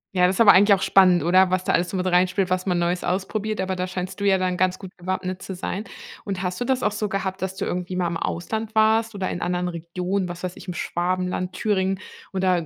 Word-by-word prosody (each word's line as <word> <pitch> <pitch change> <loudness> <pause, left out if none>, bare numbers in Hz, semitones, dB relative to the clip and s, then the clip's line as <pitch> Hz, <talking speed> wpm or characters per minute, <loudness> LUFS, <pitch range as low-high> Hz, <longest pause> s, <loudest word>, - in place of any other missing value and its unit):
Ja, 180 0 +5
das 185 +1 +1
ist - - +3
aber 205 -3 +9
eigentlich 200 +2 +6
auch 190 - +1
spannend, 185 -3 +5
oder? 185 +2 +4
Was 185 0 +1
da - - +1
alles 175 +1 +1
so 190 - -2
mit 185 0 -1
reinspielt, 180 +1 +2
was 185 +1 0
man 180 -2 +1
Neues 175 +1 0
ausprobiert, 200 +3 -2
aber 190 0 -2
da 180 0 -2
scheinst 185 +1 -5
du 200 - -2
ja 190 -1 +4
dann 180 -1 0
ganz 185 0 +1
gut 190 - -8
gewappnet 185 +1 -3
zu 190 - -6
sein. 190 +3 -4 0.4
Und 195 -2 -3
hast 180 +2 -3
du 245 - -1
das 260 0 +1
auch - - +1
so 210 0 -2
gehabt, 190 -1 -3
dass 190 0 -3
du - - -3
irgendwie 180 +1 -3
mal 180 -1 0
im 170 0 -2
Ausland 220 +5 -3
warst 220 +1 +3
oder 195 -2 -3
in 175 - -4
anderen 180 0 -1
Regionen, 180 +3 -3
was 175 0 -7
weiß 180 0 -4
ich, - - -12
im 180 - -3
Schwabenland, 180 +1 -2
Thüringen 190 -2 0 0.3
oder 185 -3 +1
185 Hz, 255 wpm, -23 LUFS, 180-195 Hz, 0.4 s, aber